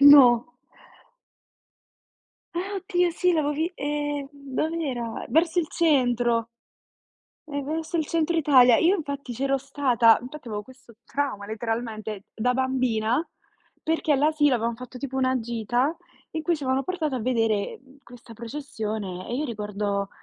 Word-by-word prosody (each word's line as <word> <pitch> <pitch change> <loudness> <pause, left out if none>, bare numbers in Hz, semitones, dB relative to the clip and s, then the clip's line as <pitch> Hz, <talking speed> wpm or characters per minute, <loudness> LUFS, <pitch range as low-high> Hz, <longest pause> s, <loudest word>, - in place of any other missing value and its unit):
No. 280 -1 +8 2.0
Ah, 390 +3 -2
oddio 360 -2 +1
sì! 360 +1 +2
L'avevo 295 -2 +1
vi 320 +4 -1
ehm, 290 -1 -2
dov'era? 280 -3 -3
Verso 330 +2 +2
il 325 - +2
centro. 245 -8 +2 1.0
Eh, 285 -1 -3
verso 320 +4 -3
il 310 - 0
centro 335 0 0
Italia. 255 -6 +6
Io 365 +4 +4
infatti 280 -5 -5
c'ero 275 +2 +1
stata, 255 -5 +4
infatti 250 0 -9
avevo 210 -1 -3
questo 255 -1 -17
trauma 275 -8 -2
letteralmente 220 -2 -4
da 250 +3 +1
bambina, 255 +1 +1 0.6
perché 320 -1 +1
all'asilo 295 -1 +3
avevam 230 0 0
fatto 250 +1 -10
tipo 265 -1 -5
una 260 -1 +2
gita 240 +5 0 0.4
in 320 - -4
cui 335 +1 +1
ci 290 - -10
avevano 260 +1 +1
portato 325 -6 -2
a - - -3
vedere, 225 -4 0
mhmm, 275 +1 -20
questa 240 -1 -14
processione 220 -6 -5
e 240 - -2
io 300 - -1
ricordo 205 -3 -2
265 Hz, 140 wpm, -25 LUFS, 230-300 Hz, 2.0 s, No